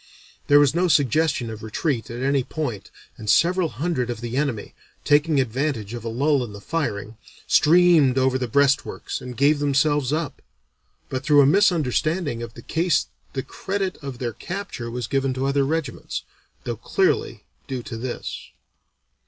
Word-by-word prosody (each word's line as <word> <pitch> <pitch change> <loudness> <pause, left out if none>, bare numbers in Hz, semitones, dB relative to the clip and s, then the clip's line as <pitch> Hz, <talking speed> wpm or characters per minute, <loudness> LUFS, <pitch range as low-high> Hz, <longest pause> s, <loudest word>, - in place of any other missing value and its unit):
There 145 0 +7
was 145 -2 +4
no 180 +2 +2
suggestion 145 -4 +2
of 110 -1 -8
retreat 115 +3 -2
at 120 +2 -5
any 140 -1 +2
point 125 -9 -4 0.3
and 110 -1 -5
several 175 - +3
hundred 150 -7 -2
of 120 - -4
the 120 +1 -5
enemy, 135 -7 -2 0.3
taking 145 0 +3
advantage 130 -3 -1
of 120 -2 -6
a 115 - -3
lull 140 +3 +1
in 110 -4 -7
the 100 - -9
firing, 110 -6 -3 0.3
streamed 160 -5 +5
over 130 0 +2
the 125 - -2
breastworks 140 +3 +1
and 125 -2 -8
gave 145 +2 +3
themselves 145 -1 +2
up, 155 -2 -2 0.7
but 130 - -3
through 145 -1 +6
a - - +4
misunderstanding 155 - +2
of 115 -1 -7
the 115 - -11
case 170 +1 +1 0.2
the 130 - -3
credit 195 -1 -3
of 135 -3 -6
their 120 -2 -3
capture 175 - -6
was 120 0 -4
given 135 +2 0
to 130 +1 -1
other 140 0 +2
regiments, 145 -3 -3 0.4
though - - -4
clearly - - 0 0.2
due 130 -3 -4
to 115 - -7
this. 120 +2 -6
135 Hz, 165 wpm, -23 LUFS, 120-155 Hz, 0.7 s, There